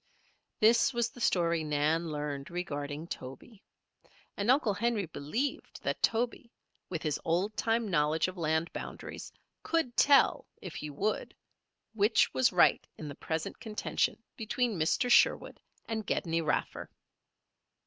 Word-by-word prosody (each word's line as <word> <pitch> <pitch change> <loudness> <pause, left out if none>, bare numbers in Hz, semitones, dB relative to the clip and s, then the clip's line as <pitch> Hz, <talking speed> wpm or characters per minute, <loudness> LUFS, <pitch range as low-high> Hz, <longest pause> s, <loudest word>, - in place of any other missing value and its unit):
This 235 +4 +4
was 235 0 0
the 245 - -12
story 170 -5 +2
Nan 155 +3 +1
learned 145 -2 -4
regarding 145 -3 -4
Toby. 170 - -9 0.7
And 205 +3 -2
Uncle 255 -5 +4
Henry 225 -1 0
believed 165 - -4
that - - -2
Toby, 235 +1 0 0.4
with 170 -3 -4
his 155 -3 -1
old 185 +6 0
time 225 0 0
knowledge 155 -3 +2
of 185 - -6
land 160 0 -1
boundaries, - - -7 0.3
could 320 -8 -1
tell, 280 -2 +4
if 180 -4 -8
he 150 - -6
would, 200 +9 -2 0.6
which 215 +1 +3
was 130 -2 +3
right - - +4
in 155 - -7
the - - -6
present 160 +2 -4
contention 215 -2 -1 0.2
between 235 +1 -1
Mr. 160 +10 +1
Sherwood 245 - +3 0.3
and 220 -1 -3
Gedney 165 -4 -1
Raffer. 155 -2 -2
180 Hz, 135 wpm, -31 LUFS, 155-225 Hz, 0.7 s, This